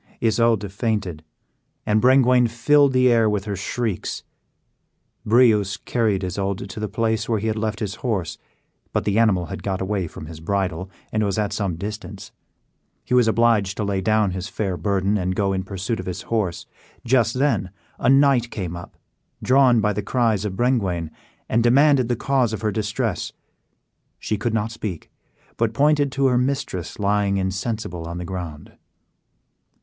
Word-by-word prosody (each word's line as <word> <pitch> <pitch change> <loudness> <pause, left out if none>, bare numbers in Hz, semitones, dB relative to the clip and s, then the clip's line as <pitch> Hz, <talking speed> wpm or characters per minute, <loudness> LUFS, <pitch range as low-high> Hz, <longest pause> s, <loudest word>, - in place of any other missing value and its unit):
Isoude 110 -3 +1
fainted, 100 -7 -2 0.6
and 105 0 +2
Brengwain 125 -1 +5
filled 140 +5 +4
the 130 -1 +4
air 115 -2 +4
with 105 -1 -1
her 100 -2 -3
shrieks. 105 +1 -3 1.0
Breuse 105 -4 +4
carried 105 -3 0
Isoude 95 +2 -3
to 105 - -7
the 105 - -2
place 110 +1 -1
where 115 - +2
he 105 - -4
had 110 -1 0
left 110 -1 -3
his 100 -3 -2
horse; 100 - -2 0.5
but - - 0
the 105 +1 +2
animal 100 -6 +3
had - - -6
got 95 -2 -2
away 95 -2 -2
from 80 - -9
his 80 0 -9
bridle, 95 +1 -2 0.2
and 110 0 0
was 100 -1 -1
at 105 -2 -1
some 95 -5 -2
distance. 100 +1 -7 0.7
He - - -3
was 125 -2 +5
obliged 110 -4 +2
to 105 - -1
lay 100 -1 -1
down 110 0 +2
his 95 +1 -4
fair 95 -4 -2
burden, 100 +2 0
and 90 0 -1
go 100 -1 +1
in 95 - -1
pursuit 100 +4 -4
of - - -6
his 90 +1 -4
horse. 100 -7 -2 0.4
Just 120 -1 +2
then 135 -9 +1 0.3
a 120 - +2
knight 135 -3 +4
came 90 -7 -5
up, 85 - -10 0.5
drawn 130 -3 +5
by 105 0 +1
the 105 - -2
cries 110 -2 0
of 95 -2 -3
Brengwain, 95 -10 0 0.4
and 115 - +2
demanded 130 +2 +4
the 120 - 0
cause 125 -2 +1
of 105 - -4
her 110 -1 0
distress. 110 -1 -2 0.8
She 110 - -2
could 110 +2 -2
not 110 0 -1
speak, 105 -7 -6 0.5
but 115 -1 0
pointed 145 +1 +3
to 135 - +1
her 125 -2 +3
mistress 125 - -2
lying 100 -1 +1
insensible 95 -2 -3
on 85 +1 -5
the 90 - -5
ground. 85 -4 -7
105 Hz, 170 wpm, -22 LUFS, 95-120 Hz, 1.0 s, Brengwain